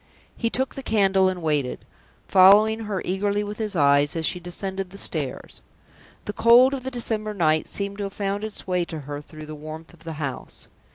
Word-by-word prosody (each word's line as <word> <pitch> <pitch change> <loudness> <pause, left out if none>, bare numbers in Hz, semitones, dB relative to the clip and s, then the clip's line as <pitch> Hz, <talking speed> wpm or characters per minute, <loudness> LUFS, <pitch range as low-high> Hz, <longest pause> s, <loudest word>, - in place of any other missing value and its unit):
He 230 - -1
took 260 +3 -2
the 270 - -6
candle 195 -5 +3
and 180 -2 -5
waited, 150 -5 -1 0.4
following 210 +4 +6
her 200 -3 -3
eagerly 205 +2 0
with 210 +1 -7
his 210 -3 -3
eyes 145 -1 +3
as 165 -1 -2
she 180 - 0
descended 190 +2 -5
the 195 - -12
stairs. 145 -9 -1 0.6
The 210 - -4
cold 240 +5 +6
of 270 - -3
the 260 - -4
December 220 -4 -3
night 155 -4 +2
seemed 200 0 -4
to 200 - -2
have 195 - -6
found 200 0 -2
its 215 -1 -5
way 180 -1 0
to 160 -3 -7
her 145 +1 -6
through 155 +1 -11
the 155 - -8
warmth 155 +2 -9
of 165 -1 -19
the 165 -1 -6
house. 145 -3 -6
190 Hz, 205 wpm, -24 LUFS, 160-210 Hz, 0.6 s, following